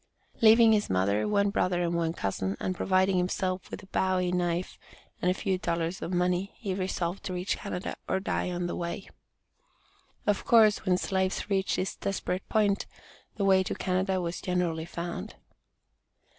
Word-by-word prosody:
Leaving 225 0 +7
his 210 -1 +1
mother, 100 +3 +1
one 200 -1 +2
brother 180 -3 +1
and 170 0 0
one 165 -1 +1
cousin, 95 - -2
and 185 - -2
providing 185 +1 +2
himself 185 +1 -1
with - - -7
a - - -11
Bowie 185 -2 0
knife 175 0 -1 0.4
and 180 - +2
a - - +3
few 190 -2 -1
dollars 170 0 -2
in 180 +1 -2
money, 180 +2 0
he 200 -6 -4
resolved 185 -1 -2
to 185 - -4
reach 180 +2 -1
Canada, 195 -2 -4
"or - - +1
die 190 - -1
on 175 0 -2
the 175 - -3
way." 170 +3 -4 1.2
Of 205 -2 +1
course, 220 -3 +5
when 180 -1 +4
slaves 190 +2 -1
reached 195 -1 +1
this 185 - -2
desperate 195 -1 -3
point, 205 -3 +2 0.5
the 200 - -1
way 190 -1 +5
to 185 - -3
Canada 190 0 0
was 175 -1 -3
generally 175 -3 -1
found. 170 - -5
185 Hz, 170 wpm, -28 LUFS, 175-195 Hz, 1.2 s, Leaving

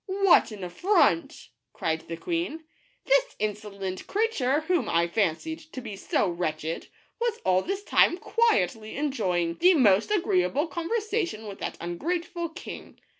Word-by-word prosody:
" - - -58 0.2
What 350 - +6
an 210 -4 -8
affront!'' 180 - +1 0.2
cried 160 0 -2
the 165 - -5
queen. 335 - -3 0.4
"This - - +2
insolent 200 -3 -4
creature, 315 - +1
whom 320 -6 0
I 170 0 +2
fancied 210 - -1
to - - -5
be 225 -5 -7
so 195 - 0
wretched, 165 -2 -3 0.3
was 470 -1 0
all 185 0 +4
this 390 - -3
time 350 - +4
quietly 220 - +1
enjoying 185 - 0
the 360 +1 +6
most 210 -7 +4
agreeable 365 -6 +1
conversation 355 - -2
with 200 -2 -8
that - - -4
ungrateful 335 - -3
king 335 +4 -10
270 Hz, 140 wpm, -27 LUFS, -, 0.4 s, What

